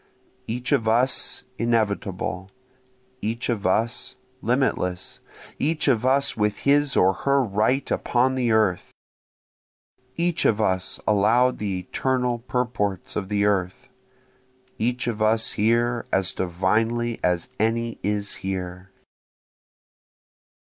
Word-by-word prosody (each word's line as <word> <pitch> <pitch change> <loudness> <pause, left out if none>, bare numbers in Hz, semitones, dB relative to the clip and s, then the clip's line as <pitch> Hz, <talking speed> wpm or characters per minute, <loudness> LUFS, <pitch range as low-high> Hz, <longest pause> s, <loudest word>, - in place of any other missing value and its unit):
Each 120 +1 -4
of 110 - +2
us 120 +4 +1 0.2
inevitable, 100 -5 -1 0.7
Each 115 +4 -2
of 105 -6 0
us 115 +6 0 0.3
limitless 115 -8 -1 0.4
each 155 +2 0
of 120 +1 +2
us 140 +1 +2
with 105 -1 -1
his 145 0 +3
or 95 +1 +5
her 140 +7 +1
right 110 +5 0
upon 125 +2 +1
the 125 -2 0
earth, 105 -5 +2 1.3
Each 170 0 0
of 110 - +3
us 95 -3 0
allow'd 115 +5 +3
the 100 -3 -2
eternal 125 +6 -1
purports 115 -6 -2
of 100 -3 -3
the 100 -1 +1
earth, 95 -3 -1 0.9
Each 125 +3 -1
of 115 -3 -3
us 110 +1 +2
here 115 +2 +1
as 95 -1 +1
divinely 110 +6 0
as 90 -1 0
any 115 +2 0
is 100 -1 -1
here. 90 -1 -5
110 Hz, 115 wpm, -24 LUFS, 100-125 Hz, 1.3 s, or